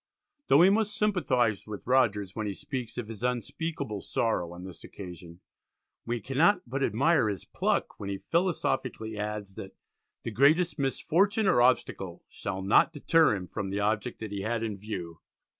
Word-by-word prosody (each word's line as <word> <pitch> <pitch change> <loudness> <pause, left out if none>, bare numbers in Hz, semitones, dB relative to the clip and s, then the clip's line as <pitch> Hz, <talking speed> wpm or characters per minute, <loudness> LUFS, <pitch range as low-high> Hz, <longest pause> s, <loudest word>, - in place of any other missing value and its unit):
Though - - +6
we 180 +5 +7
must 210 0 +1
sympathise 125 - +1
with 105 -1 -7
Rogers 105 -7 +2
when 110 -1 -2
he 100 - -2
speaks 125 +3 -6
of 120 -3 -4
his 115 -1 -9
"unspeakable 125 - -3
sorrow" 90 -7 -1
on 85 +1 -9
this 95 -2 -10
occasion, 90 -2 -10 0.7
we 120 0 -1
cannot 135 - +3
but 135 +3 -3
admire 135 0 +3
his 100 -5 -5
pluck - - -1
when 100 - -5
he 100 - -2
philosophically 135 - 0
adds 105 -1 -4
that 95 - -8 0.5
"the 115 - -4
greatest 155 - +3
misfortune 190 +10 +1
or 120 -9 +4
obstacle 95 -8 +1
shall 95 0 -5
not 100 - +4
deter" 160 -3 +3
him 95 -2 -5
from 95 +2 -4
the 100 +1 -2
object 105 +3 -1
that 110 -2 -5
he 100 -1 -3
had 115 +2 -1
in 110 -2 -2
view. 90 -6 -6
110 Hz, 170 wpm, -28 LUFS, 100-140 Hz, 0.7 s, we